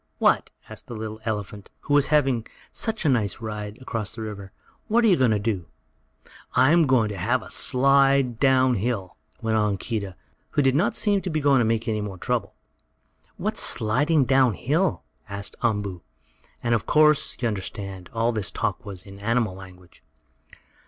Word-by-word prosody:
"What?" - - +2 0.2
asked - - -11
the 120 - -7
little 110 0 -6
elephant 105 -2 -4
who 145 - -2
was 145 -1 +5
having 135 -6 +2 0.2
such 220 -5 -2
a - - +4
nice 115 -8 +1
ride 105 -1 -6
across 115 -4 -4
the 115 - -6
river. 100 -3 -7 0.4
"What 235 +2 +3
are - - +5
you 190 - +5
going 130 -5 +3
to 110 - +2
do?" 100 -5 -2 0.9
"I 130 +3 +5
am 165 -2 +4
going 125 -5 +3
to 105 - -5
have 115 +7 0
a - - -11
slide 135 -2 +3
down 130 -2 +4
hill," 105 -4 -2 0.3
went 110 0 +1
on 105 -2 +1
Keedah, 100 -3 -4 0.4
who 145 - +2
did 135 -1 +3
not 165 +9 +1
seem 205 -2 +2
to 185 - -4
be 155 -2 -1
going 140 -2 +4
to 120 - +2
make 115 0 0
any 110 -2 -1
more 100 -2 -6
trouble. 115 +1 -2 0.8
"What's - - -1
sliding 140 +7 +2
down 130 -4 +3
hill?" 160 - 0 0.3
asked 100 0 -6
Umboo, 105 -6 -1 0.6
and 120 -1 +1
of 115 - -1
course, 150 0 +3
you 120 - 0
understand, 100 -3 -5
all 115 +1 +1
this 110 -4 -1
talk - - -3
was 95 -3 -7
in 100 0 -12
animal 115 -1 0
language. 90 -2 -14
115 Hz, 180 wpm, -24 LUFS, 105-135 Hz, 0.9 s, was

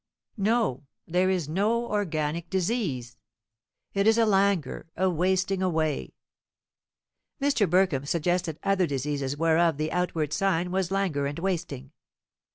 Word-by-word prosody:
"No; 205 - 0 0.2
there 180 +2 +1
is 180 -6 0
no 210 +9 +1
organic 170 -6 -2
disease. 180 - -2 0.8
It 200 +1 +2
is 225 +1 +5
a 230 - +4
languor 195 -8 +1
a 190 +2 +2
wasting 185 +2 +1
away." 160 -5 -1 1.2
Mr. 275 - +2
Burkham 175 -6 +2
suggested 170 0 0
other 195 -3 +2
diseases 140 0 -2
whereof 165 0 +3
the 155 +1 -2
outward 165 -4 -1
sign 180 -3 0
was 190 -1 0
languor 185 -8 0
and 145 - -5
wasting. 165 -7 -3
175 Hz, 125 wpm, -27 LUFS, 155-195 Hz, 1.2 s, is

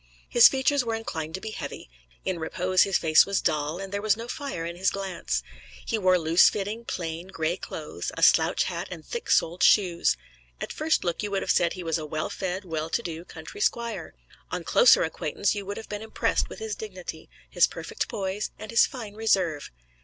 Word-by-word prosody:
His 240 - +8
features 270 +1 +2
were 230 -1 -1
inclined 160 -8 -4
to 190 - -6
be 220 - -5
heavy; - - -7 0.4
in 185 -3 -1
repose 185 +3 +1
his 195 -2 +4
face 160 +1 +5
was 200 -1 +1
dull, 150 +1 0
and 195 +1 -7
there 200 - -1
was 215 0 +2
no 230 +1 -6
fire 270 - -4
in 170 +1 -5
his 190 +2 +2
glance. 195 -3 -3 0.4
He 225 - -1
wore 185 -2 +4
loose 165 +1 +5
fitting, 210 +3 -4
plain, 165 -2 -4
gray 165 -2 -1
clothes, - - -6
a - - -1
slouch - - +5
hat - - -4
and - - -8
thick 475 -1 -6
soled 175 +3 +2
shoes. 180 -6 +4 0.4
At - - -5
first 315 +1 +1
look 170 -1 -1
you 210 - -2
would 195 -1 -1
have - - +1
said 170 -1 +2
he 185 - -7
was 165 -1 0
a 155 - -5
well 155 +1 -3
fed, 190 +1 -3
well 160 -2 -3
to 235 - -1
do 165 -3 -5
country 160 +5 -10
squire. 235 +2 -1 0.3
On - - -3
closer - - +6
acquaintance - - -1
you 200 -2 -5
would 200 - -4
have 225 - -8
been 210 0 -5
impressed 220 0 0
with - - -9
his 445 -1 -4
dignity, 485 +3 -8 0.2
his - - +4
perfect - - -4
poise 200 -2 -3
and 215 - -8
his 230 - +5
fine 225 -6 -8
reserve. 190 -9 +1
195 Hz, 210 wpm, -26 LUFS, 170-225 Hz, 0.4 s, His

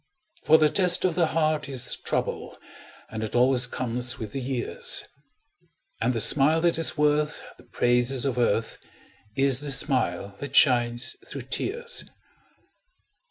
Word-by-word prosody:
For 160 - +6
the 155 -2 +2
test 180 +1 +2
of 180 - +1
the 170 -1 +1
heart 155 -2 -1
is 125 -2 +1
trouble, - - -4 0.5
And 110 0 -5
it 110 - -5
always 125 0 +3
comes 125 0 -2
with 110 -3 -7
the 135 - -5
years, 125 -2 0 1.0
And 115 +2 +1
the 115 - -2
smile 150 +8 +4
that 170 -1 +1
is 165 - +3
worth 150 0 +1 0.2
the - - -18
praises 125 +2 0
of 130 -3 -2
earth 115 -1 -1 0.6
Is 135 -1 +2
the 145 0 -4
smile 115 - -1
that 140 -1 -7
shines 120 -2 +2
through 135 -3 -7
tears. 470 - -3
135 Hz, 145 wpm, -25 LUFS, 120-150 Hz, 1.0 s, For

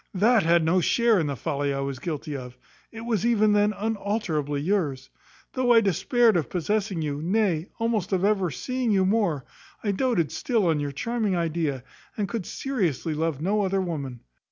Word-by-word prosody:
That 220 +4 +4
had 170 -1 +3
no 180 +3 +3
share 235 +3 +3
in 160 - 0
the 140 - -2
folly 140 +3 -2
I 135 0 -2
was 135 -1 -4
guilty 150 -2 -4
of; 125 -2 -8 0.3
it 225 - -8
was 230 -4 -1
even 215 -3 +3
then 205 0 +3
unalterably 200 -9 -2
yours. 145 -6 -1 0.4
Though 255 -2 +3
I 230 - +7
despaired 215 - +3
of 165 -4 0
possessing 190 0 -1
you, 145 -1 -3
nay, 180 -2 +1
almost 225 -5 -1
of 190 0 +1
ever 200 -4 +2
seeing 255 - -2
you 195 -3 +3
more, 190 - +1 0.4
I 205 - +1
doated 200 - 0
still 230 -6 0
on 160 -3 +2
your 145 -1 -2
charming 220 - -1
idea, 160 -6 -1 0.3
and 205 -2 -1
could 225 -5 -4
seriously 180 - -2
love 155 -1 -2
no 205 +3 +1
other 195 0 0
woman. 140 -9 -4
185 Hz, 180 wpm, -25 LUFS, 155-215 Hz, 0.4 s, I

